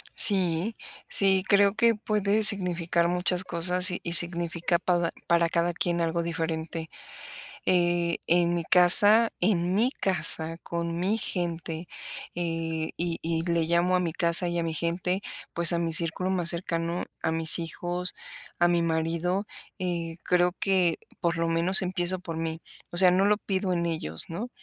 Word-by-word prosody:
Sí 190 +1 +2 0.3
sí, 190 -1 +1
creo 200 0 +3
que 230 0 +2
puede 210 -1 -1
significar 175 -4 +2
muchas 180 +1 +1
cosas, 180 +2 +3
y 180 - -5
y 170 - -4
significa 170 0 +1
pada 175 -2 -1 0.2
para 170 -1 +1
cada 170 +1 -1
quien 170 0 -2
algo 170 0 -2
diferente, 165 -1 -5 0.8
eh, 175 -1 0
en 175 0 +1
mi 170 -1 -3
casa 205 +7 +6
en 180 -3 0
mi 235 +5 +1
casa, 165 - 0
con 170 0 -5
mi 200 +5 -1
gente, 170 -3 -5 0.5
eh, 165 -2 -4
y 170 -1 -3
y 165 0 -3
le 170 -2 -1
llamo 170 +2 0
a 180 - +1
mi 170 -3 -3
casa 170 +2 +3
y 175 0 -3
a - - -2
mi 165 -1 -4
gente, 175 +4 -3 0.3
pues 170 +1 +3
a 170 - -1
mi 165 -1 -3
círculo 165 +3 0
más 175 -3 0
cercano, 170 0 -3 0.2
a 160 - -2
mis 160 -1 +6
hijos, 175 +2 -4 0.5
a 175 - +3
mi 175 -1 0
marido, 170 +4 -2 0.3
eh, 170 -2 -4
creo 180 0 +1
que 185 -4 0 0.2
por 170 -1 -2
lo 165 - -1
menos 170 +4 +8
empiezo 180 0 -1
por 165 -2 -8
mí, 165 0 -5 0.3
o 175 - -5
sea, 180 0 +7
no 190 +2 +1
lo 210 0 +2
pido 190 -2 -3
en 170 0 -2
ellos, 155 - -1
¿no?, 210 +9 -7
175 Hz, 165 wpm, -25 LUFS, 165-185 Hz, 0.8 s, menos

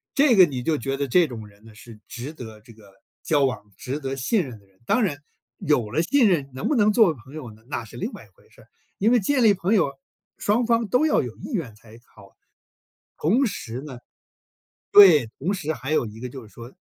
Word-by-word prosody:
这 275 -4 +4
个 185 - +8
你 135 -6 -5
就 155 +3 0
觉 135 +2 -3
得 140 0 -2
这 170 +5 +3
种 110 -4 -9
人 105 +1 -21
呢， 110 - -15
是 110 0 -14
值 125 +5 -7
得 110 -7 -11
这 115 +1 -16
个 105 -3 -19 0.3
交 145 -3 +2
往、 105 -6 -4
值 135 +4 -5
得 135 -1 -4
信 175 - 0
任 120 -5 -10
的 100 - -26
人。 95 -1 -33
当 220 - +2
然， 170 -9 -1 0.4
有 130 -8 0
了 160 +6 0
信 255 +2 +3
任， 145 -7 0
能 130 - -4
不 300 - +1
能 210 -3 +3
作 220 -4 +5
为 - - -7
朋 135 - -14
友 130 -7 -7
呢？ 110 +1 -19
那 120 -4 -5
是 115 - -13
另 - - -4
外 - - -10
一 - - -24
回 - - -25
事 - - -19
儿。 - - -22 0.3
因 215 +4 +3
为 245 - +4
建 255 +6 +1
立 215 -2 +6
朋 190 +3 -1
友， 155 -9 +1 0.4
双 220 +4 +1
方 230 -1 +1
都 250 +9 +2
要 - - +2
有 - - -7
意 - - -9
愿 155 - -3
才 110 +1 -17
好。 100 -2 -19 0.8
同 230 - +2
时 125 - -6
呢 140 -3 -9 1.0
对， 170 - +8
同 175 +9 -1
时 160 -5 -3
还 145 -1 -6
有 155 - +1
一 110 +1 -11
个， 125 - -5
就 125 -3 -10
是 - - -19
说 120 +2 -11
140 Hz, 260 characters per minute, -23 LUFS, 115-195 Hz, 1.0 s, 个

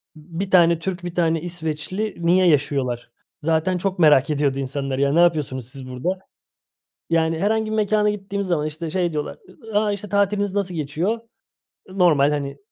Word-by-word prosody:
bir 170 +5 -6
tane 170 -2 +5
Türk, 180 +1 -4
bir 175 0 -6
tane 165 -2 +1
İsveçli 175 +4 -3
niye 180 +2 +3
yaşıyorlar? 135 -6 0 0.3
Zaten 165 +4 +1
çok 185 +1 -2
merak 150 -4 +5
ediyordu 140 -2 0
insanlar 135 0 -3
ya. 140 0 +2
Ne 165 - +3
yapıyorsunuz 145 -8 +1
siz 130 -1 -9
burada? 155 +10 -3 0.9
Yani 165 -1 +1
herhangi 220 +3 0
bir 220 - -1
mekâna 210 0 +2
gittiğimiz 200 -1 -4
zaman 165 -4 0
işte 155 +2 -5
şey 175 0 0
diyorlar, 150 -1 -4 0.4
ı - - +5
a 210 -1 +1
işte 205 +1 -5
"Tatiliniz 200 0 +1
nasıl 195 -3 -1
geçiyor?" 165 +9 -2 0.7
Normal, 170 -7 +3
hani, 140 -1 -3
170 Hz, 165 wpm, -22 LUFS, 150-190 Hz, 0.9 s, tane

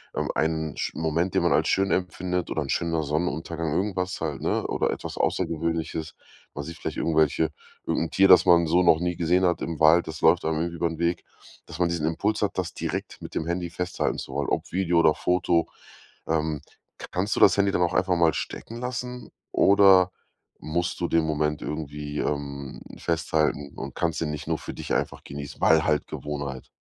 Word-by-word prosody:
Ähm, - - -1
ein 80 -2 -1
sch - - -2
Moment, 80 +3 0
den - - +3
man - - +2
halt - - +2
schön 95 0 +2
empfindet 90 -1 -1
oder 80 - -1
'n 70 - -5
schöner 80 +2 0
Sonnenuntergang, 80 +1 -2
irgendwas 90 0 -1
halt, 75 -4 -3
ne? - - 0
Oder - - 0
etwas - - -6
Außergewöhnliches, 80 -1 -1 0.4
weiß 75 +2 -6
nicht, 85 +1 -8
vielleicht - - -4
irgendwelche 80 -1 +2 0.4
irgend 85 - 0
'n - - -29
Tier 95 0 +5
das 95 -1 +7
man 85 -2 +5
so 90 +3 +3
noch 80 -2 +5
nie 90 0 -1
gesehen 90 +2 +2
hat 85 - +1
im 80 -3 -4
Wald, 80 +2 +5
das 80 0 -7
läuft 85 +2 +5
einem 80 -1 0
ü 85 - 0
übern 85 -1 -2
Weg. 85 0 0 0.4
Dass - - -9
man 90 -1 +2
diesen 85 -2 -1
Impuls 105 +7 0
hat 105 - -1
das 90 -4 -2
direkt - - -4
mit - - -9
dem 80 - -2
Handy 85 0 -2
festhalten 90 +1 -2
zu - - -7
wollen, - - -1
ob - - -2
Video 90 -2 +2
oder 80 -2 +5
Foto. 90 -2 +1 0.6
Ähm, 80 -2 0 0.4
k - - -7
kannst 95 +4 -1
du - - -1
das 100 - +7
Handy 100 0 +3
dann 90 - +1
auch 85 - +1
einfach 90 -1 +2
mal 85 -2 +4
stecken 115 +7 -5
lassen? 125 0 -5 0.2
Oder 95 -2 +6 0.5
musst 85 +4 -2
du 85 - +1
den 85 - +3
Moment 75 -1 -1
irgendwie, 75 -1 -5
ähm, 70 -2 -3 0.2
festhalten 75 -3 0
und 70 0 -6
kannst 85 -2 -1
ihn 80 -2 -1
nicht 75 - -6
nur - - 0
für - - -8
dich - - -5
einfach - - -1
genießen? 70 0 -8
Weil 80 -1 +5
halt 75 -1 +1
Gewohnheit? 70 -3 -5
85 Hz, 200 wpm, -25 LUFS, 75-90 Hz, 0.6 s, das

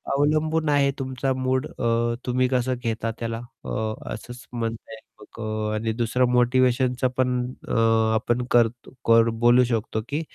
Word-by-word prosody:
अवलंबून 155 +2 +1
आहे, 140 -1 +3
तुमचा 130 0 -1
मूड 130 +2 -1
अ, 115 0 0
तुम्ही 125 0 +1
कसं 130 0 +1
घेता 115 0 -2
त्याला, 115 0 -3 0.2
अ, - - -5 0.4
असंच 120 +3 -9
म्हणता 115 -1 -4
येईल 110 0 -12 0.7
आणि 110 +1 -1
दुसरं 120 +2 +1
मोटिवेशनचं 125 +1 +2
पण 130 -1 +2 0.4
अ, - - -3 0.4
आपण 120 +2 0
करतो 120 0 +2 0.2
कर 115 0 +6
बोलू 120 +1 +6
शकतो 110 -2 -2
की 150 +3 -1
125 Hz, 140 wpm, -24 LUFS, 115-130 Hz, 0.7 s, कर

